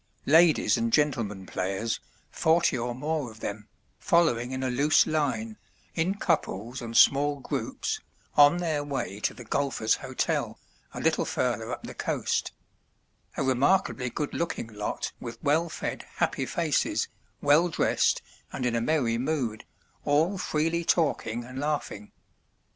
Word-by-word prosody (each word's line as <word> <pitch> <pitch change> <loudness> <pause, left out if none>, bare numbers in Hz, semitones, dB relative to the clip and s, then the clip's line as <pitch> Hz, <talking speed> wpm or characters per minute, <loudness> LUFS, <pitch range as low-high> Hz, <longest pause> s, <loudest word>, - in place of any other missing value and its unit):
Ladies 160 -2 +5
and 115 0 0
gentlemen 115 -9 +1
players, 95 +5 -2 0.3
forty 160 -3 +3
or 120 0 -2
more 150 0 -2
of 110 0 -14
them, 105 0 -5 0.3
following 125 -9 +2
in 130 0 -3
a 130 - 0
loose 145 +4 +4
line, 155 - -1 0.4
in 175 +4 0
couples 125 - -1
and 115 -1 -2
small 145 +1 +5
groups, 140 - -3 0.4
on 145 +3 +7
their 160 -4 -1
way 135 -9 -4
to - - -1
the 125 - -9
Golfers' 125 -2 0
Hotel, - - -2 0.4
a - - -4
little - - +2
further - - -1
up - - -5
the - - -7
coast; - - -1 0.9
a - - 0
remarkably 130 0 +2
good 145 +4 -3
looking 120 -9 -3
lot 105 0 -3
with 115 -1 -7
well 160 +3 +2
fed - - -5
happy - - 0
faces, - - 0 0.3
well 150 +5 +4
dressed 165 - +1 0.3
and 130 - -3
in 120 - +1
a 115 - +1
merry 120 -4 +1
mood, 125 -6 -2 0.4
all 160 +7 +2
freely 165 +1 0
talking 135 -9 +1
and 125 +2 -8
laughing. 145 -8 -3
140 Hz, 140 wpm, -27 LUFS, 115-160 Hz, 0.9 s, on